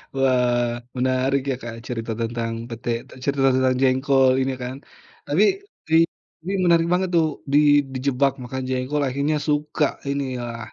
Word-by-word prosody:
Wah, 125 -2 +2 0.3
menarik 130 +2 +1
ya 130 - 0
Kak 120 -1 -6
cerita 115 -2 -4
tentang 115 0 -2 0.2
pete, 115 0 -6 0.2
t - - -20
cerita 135 -1 +2
tentang 130 0 +2
jengkol 130 0 +4
ini 130 0 0
kan. 125 +1 -5 0.5
Tapi, 165 +8 +3 0.4
di 160 - +2 0.5
ini 195 - -2
menarik 170 -1 +4
banget 185 0 +1
tuh, 160 -2 +4 0.3
di - - +6 0.4
dijebak 135 +1 +1
makan 130 +1 -5
jengkol 130 +3 -1
akhirnya 140 +4 0
suka 150 0 +1 0.2
ini, 140 0 -1 0.2
wah. 115 -2 -6
130 Hz, 150 wpm, -23 LUFS, 125-145 Hz, 0.5 s, di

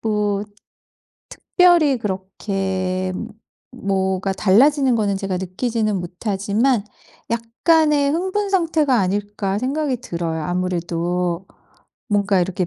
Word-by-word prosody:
뭐 210 -2 0 0.9
특별히 345 -7 +3
그렇게 190 -2 -2 0.6
뭐가 195 -4 -1
달라지는 255 +8 +4
거는 205 -2 0
제가 195 -1 -2
느끼지는 215 +3 -1
못하지만 200 +6 0 0.5
약간의 285 +6 +2
흥분 380 +4 -1
상태가 320 -7 +2
아닐까 200 +1 -1
생각이 270 +2 -1
들어요. 170 -8 -3
아무래도 175 0 -2 0.6
뭔가 200 -2 +2
이렇게 180 0 -2
200 Hz, 240 characters per minute, -21 LUFS, 185-255 Hz, 0.9 s, 달라지는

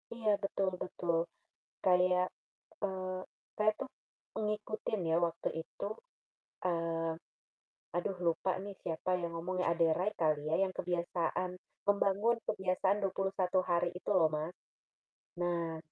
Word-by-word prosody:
Iya 220 -2 +2
betul 195 -1 +1
betul, 170 -2 0 0.7
kayak, 180 0 +4 0.6
eee, 185 -1 -2 0.4
saya 215 0 +4
tuh 270 - -3 0.5
ngikutin 210 0 -1
ya 165 - +5
waktu 165 0 -2
itu, 170 - -6 0.8
eee, 165 -1 0 0.8
aduh 185 +2 0
lupa 170 +3 +2
nih 200 -1 -6
siapa 165 +1 -2
yang 170 -1 -2
ngomong 175 +3 -2
ya, - - +3
Ade 170 0 +4
Rai 185 +5 +1
kali 155 -3 +3
ya - - +4
yang 190 -1 -1
kebiasaan 175 0 0 0.4
membangun 205 +3 +4
kebiasaan 190 0 +2
21 195 -1 +1
hari 175 0 +3
itu 180 - -3
loh 180 -5 +6
Mas, 155 +3 -2 0.9
nah, 170 -2 0
180 Hz, 125 wpm, -34 LUFS, 170-195 Hz, 0.9 s, loh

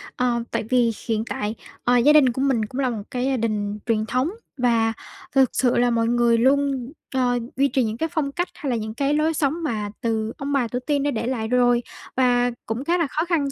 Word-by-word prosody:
Ờ, 240 -2 0
tại - - -1
vì 245 -2 +3 0.2
hiện 220 -1 0
tại, 210 +2 -3 0.3
ờ, 245 0 +4
gia 285 +5 +5
đình 275 -5 +6
của 260 - -3
mình 260 -6 +2
cũng 255 +5 -6
là 255 - +1
một 220 -4 -4
cái 250 0 -1
gia 265 -1 +1
đình 210 -2 -2
truyền 220 -2 +1
thống 255 +7 0 0.3
và 230 -3 +2 0.4
thực 265 -2 +5
sự 250 -2 +2
là 245 0 +3
mọi 230 -1 +1
người 235 0 +3
luôn, 270 0 +1 0.2
ờ, 245 -1 +2 0.2
duy 275 +1 +3
trì 265 -2 +1
những 220 0 -2
cái 320 - -1
phong 290 -3 -1
cách, 350 +5 -1
hay 285 - -4
là 245 - +1
những 220 -1 -4
cái 275 +4 0
lối 305 +2 +2
sống 310 +2 -1
mà 215 -8 -2
từ 225 -1 -1
ông 280 0 -3
bà 265 -4 +2
tổ 245 +2 -3
tiên 285 +2 -1
đã 290 - +1
để 235 0 -2
lại 230 -4 -2
rồi. 245 0 +3 0.3
Và 245 -1 +3
cũng 225 +4 -3
khá 345 +3 +2
là 335 -4 +1
khó 310 +4 -1
khăn 315 -6 0
245 Hz, 240 wpm, -23 LUFS, 230-275 Hz, 0.4 s, đình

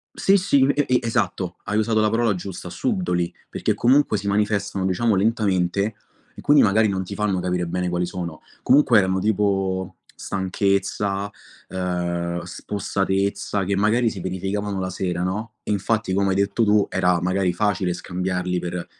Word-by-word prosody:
Sì, 195 - +4
sì, 175 -9 +3
e 145 +1 +2
e 125 - +3
esatto, 100 -6 -1
hai 105 +1 -1
usato 110 0 +1
la 110 0 +2
parola 115 -2 +2
giusta, 90 -1 -7
subdoli, 90 - -1 0.2
perché - - -1
comunque 130 -3 +3
si 100 0 -4
manifestano 100 -1 0
diciamo 100 +4 +1
lentamente 100 -1 +1 0.4
e - - -10
quindi 145 0 +5
magari 110 +2 +4
non 95 -1 -1
ti 95 +2 -7
fanno 100 -2 0
capire 90 -1 -1
bene 90 +1 -2
quali 90 0 0
sono. 85 -3 -6 0.2
Comunque 130 -4 +5
erano 95 -1 +2
tipo, 95 -3 0 0.2
stanchezza, 100 +1 -1 0.4
uhm, 85 -1 -2
spossatezza, 100 +2 -2
che 100 +1 -1
magari 110 +4 +2
si 95 - -7
verificavano 95 +2 -3
la 95 0 -2
sera, 90 -1 -2
no, 105 +5 -3
infatti 105 0 0
come 100 +1 +2
hai - - +1
detto 100 +3 +1
tu 105 -1 +3
era 90 -1 +2
magari 90 0 +1
facile 95 -2 0
scambiarli 90 0 -2
per 90 0 -4
100 Hz, 160 wpm, -23 LUFS, 90-105 Hz, 0.4 s, quindi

